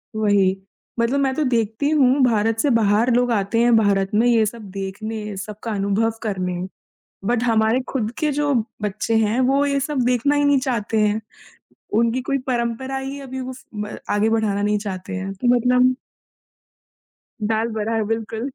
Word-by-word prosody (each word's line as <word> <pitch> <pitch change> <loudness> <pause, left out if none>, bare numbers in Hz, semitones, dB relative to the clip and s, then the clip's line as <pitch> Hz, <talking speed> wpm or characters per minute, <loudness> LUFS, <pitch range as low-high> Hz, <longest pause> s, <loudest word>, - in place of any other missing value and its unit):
वही। 205 -3 +3 0.4
मतलब 240 +4 +1
मैं 270 -1 +1
तो 310 - 0
देखती 230 +4 0
हूँ 280 -3 +3
भारत 225 -2 +2
से 290 - +2
बाहर 225 0 +3
लोग 245 0 +2
आते 210 +1 0
हैं 240 0 +4
भारत 200 -3 +2
में 225 +3 +4
ये 230 -2 +4
सब 215 -1 -6
देखने 210 +2 -5
सबका 210 +3 -6
अनुभव 200 +3 +1
करने, 185 -4 -2 0.7
बट 240 +2 +1
हमारे 225 0 +2
खुद 225 -5 -2
के 305 -2 +1
जो 290 0 0 0.3
बच्चे 210 +2 -1
हैं, 220 +2 +2
वो 270 +2 +3
ये 280 -1 0
सब 285 +1 -2
देखना 250 +3 +2
ही 290 - +2
नहीं 285 -1 +4
चाहते 230 -4 -1
हैं। 210 +1 +2 0.8
उनकी 235 +2 +2
कोई 275 +2 -1
परंपरा 245 +2 -2
ही 270 +1 -5
है 280 - -8
अभी 260 0 -6
वो 260 0 -5
फ़ 260 - -14
ब 210 0 -5
आगे 205 +1 +2
बढ़ाना 215 -3 0
नहीं 210 0 +1
चाहते 190 -3 -6
हैं। 190 +1 -4
तो 220 +6 -1
मतलब 250 +1 +3 1.6
दाल 220 +1 +1
बराबर 220 +1 0
बिल्कुल। 225 +3 -3
225 Hz, 175 wpm, -21 LUFS, 210-255 Hz, 1.6 s, हैं